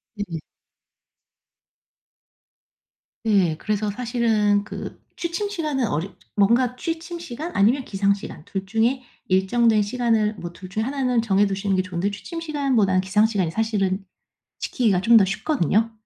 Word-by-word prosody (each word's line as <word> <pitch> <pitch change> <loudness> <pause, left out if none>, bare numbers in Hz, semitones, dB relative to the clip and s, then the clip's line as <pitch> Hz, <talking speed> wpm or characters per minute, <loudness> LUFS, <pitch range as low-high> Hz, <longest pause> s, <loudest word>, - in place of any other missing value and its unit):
네네. 190 -6 -4 2.8
네. 195 -7 +3
그래서 210 +3 -1
사실은 220 -3 +1
그 - - -7 0.2
취침 345 +4 -3
시간은 300 - -1
어렵 170 +3 -3 0.2
뭔가 235 +5 +3
취침 330 +3 -4
시간 330 +1 -6
아니면 240 +7 +3
기상 200 0 +2
시간 195 -6 -8
2 195 -1 -4
중에 225 +6 +1 0.3
일정된 215 +4 +3
시간을 220 -1 +1
뭐 175 -4 -7
2 185 +2 -11
중에 215 +3 -2
1 270 +3 -2
는 250 -2 +2
정해 205 -2 +3
두시는 195 0 -1
게 185 - +2
좋은데 185 +2 -2
취침 330 - -7
시간보다는 265 - +1
기상 210 +3 +3
시간이 195 -7 0
사실은 200 -2 0 0.6
지키기가 210 -7 +1
좀 230 +4 +6
더 200 - +6
쉽거든요. 220 - +1
215 Hz, 285 characters per minute, -23 LUFS, 195-250 Hz, 2.8 s, 좀